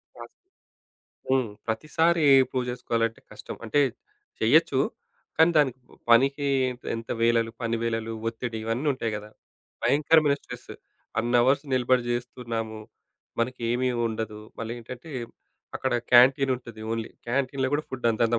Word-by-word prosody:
Task. - - -11 1.0
హ్మ్. 130 -4 +2 0.2
ప్రతిసారి 160 +7 +1 0.3
prove 125 -1 -1
జేసుకోవాలంటే 115 -2 -1
కష్టం. - - -8
అంటే 145 +6 +2 0.6
చెయ్యొచ్చు. - - +4 0.6
కానీ 160 +1 +6
దానికి 135 -4 +3 0.3
పనికి 140 +4 +4 0.5
ఎంత 115 0 -7
వేళలు, 115 -1 +3
పని 115 0 0
వేళలు 115 -1 -2 0.2
ఒత్తిడి 115 0 -5
ఇవన్నీ 115 +6 -2
ఉంటాయి 115 -4 -3
గదా! 105 +1 -9 0.5
భయంకరమైన 150 0 +4
స్ట్రెస్ - - -10 0.5
అన్నవర్స్ 120 +4 +3
నిలబడి 130 0 +3
జేస్తున్నాము, 115 -2 -4 0.6
మనకి 125 +1 -2
ఏమీ 125 +1 +1 0.2
ఉండదు 110 -1 -5 0.2
మళ్ళేంటంటే, 120 +5 -7 0.6
అక్కడ 130 - -1 0.2
క్యాంటీన్ 130 +2 +6
ఉంటది 115 -3 -11
ఓన్లీ. 115 -1 -3 0.2
క్యాంటీన్‌లో 130 +1 0
గూడా 155 - -1
ఫుడ్ 125 -2 -3
అంతంత 115 +1 +1
120 Hz, 120 wpm, -26 LUFS, 115-135 Hz, 1.0 s, కానీ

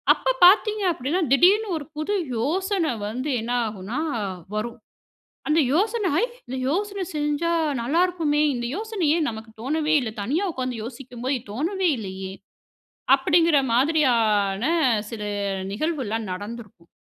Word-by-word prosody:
அப்ப - - 0
பார்த்தீங்க 425 +3 +5
அப்படினா 315 +7 -1
திடீர்னு 400 +9 +5
ஒரு 290 - -9
புது 310 +7 -1 0.2
யோசனை 365 - 0 0.2
வந்து 255 +7 -3
என்ன 230 +2 -4 0.2
ஆகுன்னா 210 +5 -5 0.6
வரும். 235 +3 -3 0.7
அந்த 310 +1 +4
யோசன 420 +6 +1
வை 335 - +3 0.2
"இந்த 255 - -5
யோசனை 395 +5 -1
செஞ்சா 295 +2 0 0.3
நல்லா 280 +9 +1
இருக்குமே, 320 -5 0
இந்த 240 -1 -3
யோசனை 430 -3 -3
ஏன் 325 -3 +1
நமக்கு 220 0 -9
தோனவே 305 +5 0
இல்ல, 240 -4 -3
தனியா 300 - 0
உட்கார்ந்து 255 -4 -3
யோசிக்கும் 245 +1 -9
போது 265 +2 +1
தோனவே 350 - 0
இல்லையே" 190 -2 -6 0.8
அப்டின்கிற 325 +3 +4
மாதிரியான 230 -7 +2 0.5
சில 225 -2 -6 0.5
நிகழ்வுல்லாம் 225 - -2
நடந்திருக்கும். 205 -3 -9
285 Hz, 125 wpm, -24 LUFS, 230-340 Hz, 0.8 s, பார்த்தீங்க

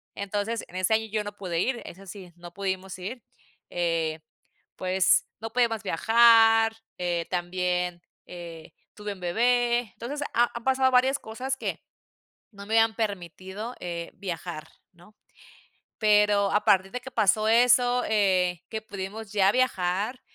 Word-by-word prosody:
Entonces 205 +3 -3
en - - -14
este 185 +4 +1
año 220 0 -1
yo 215 -1 -1
no 205 0 -7
pude 175 -4 -3
ir, 240 +4 -1
eso 195 +3 -11
sí, 185 -2 -10
no 175 0 -11
pudimos 190 -1 -4
ir, 220 +6 -7 0.5
eh, 165 -2 -1 0.6
pues, 185 0 +2 0.2
no 225 0 -5
podíamos 230 -3 +1
viajar. 225 +3 +5 0.2
Eh, 175 -1 -1
también, 180 0 -1 0.3
eh, 170 -2 -10 0.2
tuve 210 -1 -5
un 195 - -15
bebé. 240 +6 +2
Entonces, 285 +5 -6
ha 240 +1 +3
han 235 - -6
pasado 260 0 +2
varias 260 +2 +4
cosas 255 +4 -4
que - - -4 0.7
no 200 0 -11
me 220 - -2
habían 225 0 +3
permitido, 200 +2 -5
eh, 170 -1 -5
viajar, 170 -4 -6 0.2
¿no? 175 +5 -21 0.8
Pero 210 -2 +3
a 210 +1 +2
partir 190 0 +3
de 250 - -4
que 265 +1 -10
pasó 215 -1 +2
eso, 245 +1 +4
eh, 185 -5 +1
que 220 -1 -4
pudimos 205 +1 -7
ya 195 -1 +4
viajar, 215 -1 0
205 Hz, 145 wpm, -26 LUFS, 180-230 Hz, 0.8 s, viajar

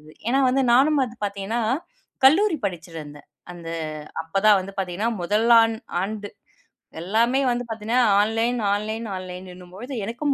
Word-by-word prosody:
இது. 155 +1 -16 0.2
ஏன்னா 265 +1 +3
நானும் 285 +3 +4
ப - - +1 0.2
பாத்தீங்கன்னா, 200 +4 -3 0.6
கல்லூரி 325 +4 +4
படிச்சுட்டு 170 -3 -7
இருந்தேன். 145 0 -13 0.3
அந்த 170 -1 -10 0.5
அப்பத் 195 +6 -1
தான் 210 -2 +7
வந்து 195 +1 -9
பாத்தீங்கன்னா 190 +5 -2
முதலாண்டு 220 -1 +2 0.7
எல்லாமே 230 +8 +2
வந்து 245 0 -1
பாத்தீங்கன்னா 225 +3 -1 0.2
ஆன்லைன், 225 +3 +1
ஆன்லைன், 215 +2 -2
ஆன்லைன்னும்பொழுது 185 +6 -8
எனக்கும் 245 +7 -1
215 Hz, 120 wpm, -23 LUFS, 185-240 Hz, 0.7 s, தான்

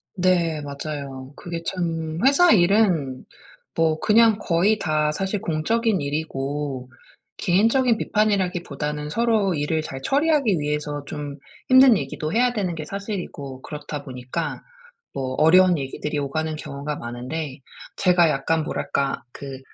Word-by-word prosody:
네 175 -4 +1
맞아요. 140 -2 -6
그게 170 -1 -6
참 165 -3 -2
회사 330 +6 +6
일은 175 -9 +3 0.5
뭐 160 -1 +2
그냥 220 0 +5
거의 195 +3 +2
다 155 -4 +1
사실 195 +5 -2
공적인 215 +7 0
일이고 140 -2 -3 0.5
개인적인 230 +6 +3
비판이라기보다는 175 -9 -1
서로 220 -3 +1
일을 155 +2 0
잘 135 -3 -7
처리하기 280 - +2
위해서 150 0 -2
좀 145 -1 -6 0.3
힘든 260 -3 +7
얘기도 155 +2 -4
해야 245 +3 +2
되는 190 -7 -2
게 155 -1 -6
사실이고 180 - -6
그렇다 150 -1 -6
보니까 130 +5 -5 0.5
뭐 130 -1 -3
어려운 180 +3 +6
얘기들이 145 +2 -3
오가는 155 +3 -2
경우가 145 0 -5
많은데 130 +5 -5 0.4
제가 175 -3 +4
약간 155 +3 0
뭐랄까? 140 -4 -2
그 135 -2 -8
160 Hz, 290 characters per minute, -23 LUFS, 145-195 Hz, 0.5 s, 힘든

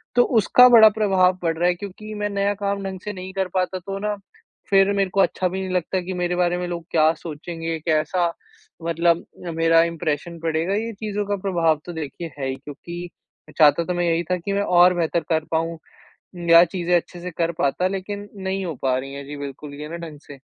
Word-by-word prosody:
तो 245 - +6 0.2
उसका 250 +4 +7
बड़ा 220 -3 +9
प्रभाव 190 -4 +2
पड़ 165 -2 -1
रहा 175 +2 +2
है 180 - +1
क्योंकि 205 +3 -8
मैं 205 0 -2
नया 200 0 0
काम 200 0 -2
ढंग 190 -1 -5
से 210 - -4
नहीं 185 0 -8
कर 190 -1 -1
पाता 185 0 0
तो 195 +2 -6
ना 210 0 -1 0.5
फिर 195 0 +5
मेरे 195 -1 +1
को 200 - -1
अच्छा 185 - +1
भी 190 +1 -3
नहीं 185 -1 -4
लगता 180 +1 0
कि 185 +1 -5
मेरे 180 0 -1
बारे 175 0 +1
में 180 0 -3
लोग 170 -1 -5
क्या 160 -1 +4
सोचेंगे 165 +1 -5
कैसा 165 +3 +1 0.6
मतलब 170 0 +1 0.3
मेरा 165 0 +4
इंप्रेशन 170 0 -3
पड़ेगा। 165 +3 -1
ये 225 +2 -2
चीज़ों 210 -1 -2
का 205 - 0
प्रभाव 165 -5 +2
तो 175 - -6
देखिए 160 +1 -6
है 135 - -2
ही 130 - -2
क्योंकि 170 +5 -8 0.5
मैं - - -14
चाहता 155 +1 +5
तो 180 - -2
मैं 175 0 0
यहीं 170 0 +1
था 180 - +2
कि 195 +3 -4
मैं 200 - +1
और 180 -1 +5
बेहतर 170 0 0
कर 160 -2 +1
पाऊँ 165 +1 -1 0.7
या 170 0 +9
चीज़ें 175 +1 0
अच्छे 175 +1 -6
से 180 0 -5
कर 170 0 +1
पाता 180 +7 +1
लेकिन 200 +2 -5
नहीं 190 -1 -3
हो 165 - -4
पा 130 -1 +2
रही 135 +1 -6
हैं 140 0 -7
जी, 145 +1 -7
बिल्कुल 140 +1 -7
ये 150 - -6
ना 170 - -5
ढंग 150 -2 -11
से। 140 -2 -11
175 Hz, 220 wpm, -22 LUFS, 165-195 Hz, 0.7 s, बड़ा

